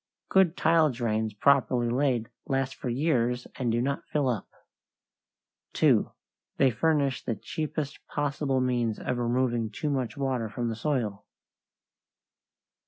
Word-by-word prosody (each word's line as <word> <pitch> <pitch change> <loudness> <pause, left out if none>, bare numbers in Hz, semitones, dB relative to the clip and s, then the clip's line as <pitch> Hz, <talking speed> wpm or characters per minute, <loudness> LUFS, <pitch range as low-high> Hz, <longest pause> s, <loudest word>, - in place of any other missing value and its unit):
Good 190 -3 +4
tile 160 -1 +4
drains 110 -4 -1
properly 130 0 +3
laid 125 -2 +1 0.2
last 135 -1 0
for 125 - -5
years 125 -2 +1
and 125 -3 0
do 120 +1 +1
not 140 +1 -2
fill 145 -3 +1
up. 115 -6 -2 1.3
2. - - +3 0.5
They 135 -2 +4
furnish 140 +2 +1
the 115 - -2
cheapest 155 +5 -4
possible 145 -2 -1
means 120 -3 0
of 125 - -2
removing 120 -1 0
too 145 +8 -3
much 130 -3 -2
water 130 -5 -1
from 120 +2 -2
the 115 - -3
soil. 115 -6 -2
130 Hz, 130 wpm, -28 LUFS, 120-140 Hz, 1.3 s, Good